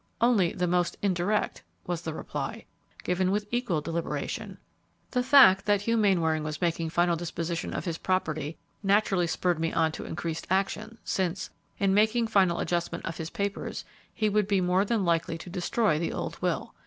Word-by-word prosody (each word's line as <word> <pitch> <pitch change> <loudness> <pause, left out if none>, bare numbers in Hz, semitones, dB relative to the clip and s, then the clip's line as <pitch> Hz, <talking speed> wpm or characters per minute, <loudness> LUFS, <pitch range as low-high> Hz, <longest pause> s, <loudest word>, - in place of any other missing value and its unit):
"Only 225 -8 +3
the 180 - -1
most 175 0 +1
indirect," 200 +2 0 0.2
was 175 -2 -2
the 160 -2 -4
reply, - - -5 0.4
given 180 +1 +1
with 205 +2 0
equal 240 -10 0
deliberation. 165 +2 -4 0.5
"The 250 - +1
fact 250 -8 +7
that 205 -1 +3
Hugh 230 +2 +1
Mainwaring 170 -8 +2
was 155 0 -4
making 165 -1 0
final 175 +1 +2
disposition 170 0 -3
of - - -4
his 165 -2 -3
property 160 -5 -1 0.2
naturally 195 -3 +2
spurred 175 0 0
me 165 0 0
on 160 -1 +2
to - - -7
increased 160 0 -4
action, 205 +4 -1
since, 190 0 -2 0.3
in 195 -1 +2
making 220 +3 +3
final 190 -5 +3
adjustment 175 -1 -2
of 165 - -4
his 160 0 -5
papers, 200 +1 -3 0.3
he 220 -2 0
would 210 -1 +2
be 200 -2 +2
more 180 +1 +2
than 215 -2 0
likely 165 -1 +1
to 175 +2 -10
destroy 180 -1 +1
the 170 - -2
old - - -5
will. - - -1
180 Hz, 175 wpm, -28 LUFS, 165-205 Hz, 0.5 s, fact